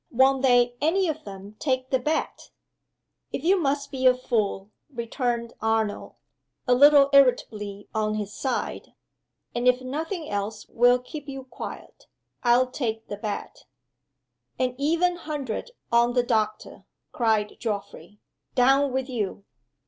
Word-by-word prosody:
"won't 265 +2 +3
they 245 -2 +4
any 360 +5 +2
of 315 -1 -3
them 200 +1 -10
take 260 -3 -1
the 260 - +3
bet?" 300 +5 -2 0.8
"If 270 - -4
you 365 +4 +4
must 280 -2 -1
be 260 -1 +2
a 250 - +6
fool," 215 -5 -2 0.2
returned 235 -1 -2
Arnold, 220 -1 -1 0.5
a 250 - +5
little 280 +1 +7
irritably 210 -7 +2
on 215 -1 0
his 210 -1 -4
side, 265 - -3 0.6
"and 240 +1 -1
if 250 0 +4
nothing 310 +6 -4
else 205 +1 -4
will 245 +1 +4
keep 285 +3 -9
you 270 -1 -6
quiet, 255 - -9 0.3
I'll 250 +1 +3
take 225 -4 -3
the 205 - -4
bet." 210 0 -6 0.9
"An 255 -1 0
even 335 +5 +1
hundred 295 - -4 0.2
on 235 +1 +4
the 245 -1 +3
doctor!" 215 -3 -2 0.3
cried 220 -3 0
Geoffrey. 205 -1 -5 0.4
"Done 270 +2 +4
with 265 0 -2
you!" 210 -5 -4
250 Hz, 135 wpm, -25 LUFS, 220-275 Hz, 0.9 s, little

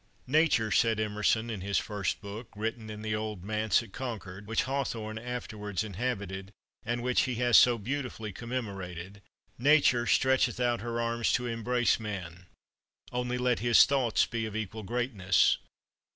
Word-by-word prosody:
"Nature," 135 -6 +3
said 110 +2 +3
Emerson 110 +2 +1
in 105 -4 -5
his 100 +1 0
first 100 -3 -2
book, 105 +3 -7
written 110 +1 -4
in 105 0 -7
the 110 -1 -2
old 105 -4 -4
Manse 110 0 +1
at - - -14
Concord, 105 -6 -6
which 115 0 +1
Hawthorne 115 -5 -3
afterwards 110 -4 -4
inhabited, 100 -3 -4 0.3
and 120 +1 -2
which 125 0 +3
he 130 -2 -2
has 120 0 +2
so 120 -1 +7
beautifully 120 -2 -4
commemorated 100 -5 -6 0.4
"Nature 130 -3 +4
stretcheth 130 -1 +3
out 120 -1 +1
her 120 0 -3
arms 115 0 0
to 125 - +1
embrace 120 +1 +1
man: 90 -5 -6 0.6
only 125 0 -1
let 125 -1 +1
his 120 0 +6
thoughts 130 -6 +2
be 115 -1 -3
of 110 - -8
equal 110 0 -4
greatness. 105 -5 +2
115 Hz, 150 wpm, -30 LUFS, 105-125 Hz, 0.6 s, so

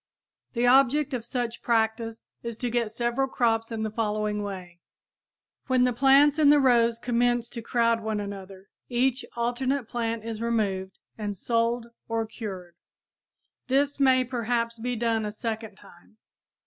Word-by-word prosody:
The 240 0 +1
object 270 +3 +4
of 245 -3 -2
such 240 -2 -3
practice 225 0 0
is 235 -2 -5
to 245 0 -2
get 235 -2 0
several 240 +4 0
crops 225 -3 0
in 220 -1 -3
the 215 - -2
following 210 -1 -1
way: 185 -4 -7 0.9
When 255 -2 +3
the 250 0 +2
plants 275 +4 +5
in 295 -2 +6
the 295 0 +7
rows 235 -3 +4
commence 240 0 +1
to 235 - -6
crowd 230 0 +1
one 215 -1 -2
another 195 -1 -8 0.2
each 255 +1 +1
alternate 245 +2 -1
plant 230 -2 -3
is 225 -1 -5
removed 200 -5 -1 0.2
and 205 -2 -3
sold 230 +2 0 0.2
or 225 0 0
cured. 195 -6 -7 0.9
This 280 +2 +1
may 260 -2 +5
perhaps 235 -2 -2
be 245 +2 -2
done 225 -1 0
a 210 - -3
second 220 -1 -5
time. 175 +4 -19
230 Hz, 150 wpm, -26 LUFS, 220-245 Hz, 0.9 s, the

